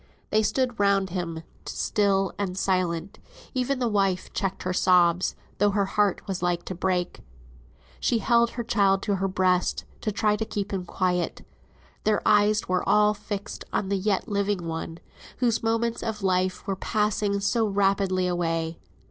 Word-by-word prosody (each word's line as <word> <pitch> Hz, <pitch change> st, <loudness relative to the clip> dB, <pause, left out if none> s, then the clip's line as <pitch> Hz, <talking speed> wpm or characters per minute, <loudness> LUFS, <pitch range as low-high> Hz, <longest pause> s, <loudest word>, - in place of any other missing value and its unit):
They 215 Hz, -, +4 dB
stood 245 Hz, +2 st, 0 dB
round 200 Hz, -2 st, +2 dB
him 170 Hz, -3 st, -4 dB, 0.2 s
still 195 Hz, -2 st, +1 dB
and 190 Hz, -2 st, -2 dB
silent; 185 Hz, -1 st, -1 dB, 0.3 s
even 260 Hz, +2 st, 0 dB
the 250 Hz, -1 st, 0 dB
wife 195 Hz, -4 st, 0 dB
checked 195 Hz, -1 st, -2 dB
her 185 Hz, -, -1 dB
sobs, 180 Hz, -1 st, +3 dB, 0.2 s
though 205 Hz, +1 st, +4 dB
her 200 Hz, 0 st, +1 dB
heart 205 Hz, 0 st, +1 dB
was 190 Hz, -3 st, -3 dB
like 175 Hz, -1 st, 0 dB
to -, -, -4 dB
break. 180 Hz, 0 st, -1 dB, 0.8 s
She 235 Hz, -, +1 dB
held 235 Hz, +2 st, +3 dB
her 235 Hz, 0 st, -5 dB
child 195 Hz, -3 st, +2 dB
to 200 Hz, -2 st, 0 dB
her 195 Hz, +1 st, 0 dB
breast, 185 Hz, -1 st, +1 dB, 0.2 s
to 215 Hz, -, -1 dB
try 210 Hz, 0 st, +1 dB
and 210 Hz, +1 st, -1 dB
keep 205 Hz, -1 st, -3 dB
him 185 Hz, -2 st, -2 dB
quiet. 180 Hz, -1 st, -1 dB, 0.6 s
Their 215 Hz, -1 st, +1 dB
eyes 210 Hz, 0 st, +4 dB
were 180 Hz, 0 st, +1 dB
all 210 Hz, +1 st, +5 dB
fixed 205 Hz, -1 st, -6 dB
on 190 Hz, -, -1 dB
the 200 Hz, -, +1 dB
yet 195 Hz, +2 st, 0 dB
living 200 Hz, -4 st, -1 dB
one, 165 Hz, 0 st, -4 dB, 0.4 s
whose 235 Hz, -2 st, +1 dB
moments 230 Hz, +1 st, 0 dB
of 210 Hz, -3 st, -4 dB
life 185 Hz, -1 st, 0 dB
were 195 Hz, -2 st, -1 dB
passing 210 Hz, 0 st, 0 dB
so 220 Hz, +3 st, +1 dB
rapidly 195 Hz, -2 st, +1 dB
away. 165 Hz, -2 st, -1 dB
195 Hz, 165 wpm, -26 LUFS, 185-210 Hz, 0.8 s, all